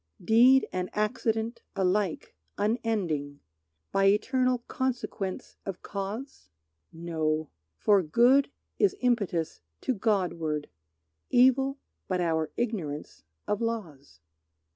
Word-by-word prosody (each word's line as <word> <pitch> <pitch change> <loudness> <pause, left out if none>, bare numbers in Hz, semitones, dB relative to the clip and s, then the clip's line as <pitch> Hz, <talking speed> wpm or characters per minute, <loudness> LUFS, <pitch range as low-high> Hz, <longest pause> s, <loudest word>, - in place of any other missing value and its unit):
Deed 245 +6 +6
and 180 0 -2
accident 225 +1 -1
alike 190 -2 0 0.2
unending 195 - -1 0.5
By 195 0 +2
eternal 250 +4 +2
consequence 240 -7 -3
of 195 -2 -6
cause? 210 +7 -6 0.4
No. 160 -2 -2 0.3
For 205 -2 +4
good 240 - +4 0.3
is 400 -1 +3
impetus 200 -10 0 0.2
to 260 - 0
Godward; 175 -8 -1 0.6
Evil, 265 +2 +4 0.3
but 185 -1 0
our 160 -3 0
ignorance 180 -12 -3 0.3
of 210 - -1
laws. 155 - -5
205 Hz, 95 wpm, -28 LUFS, 165-240 Hz, 0.6 s, Deed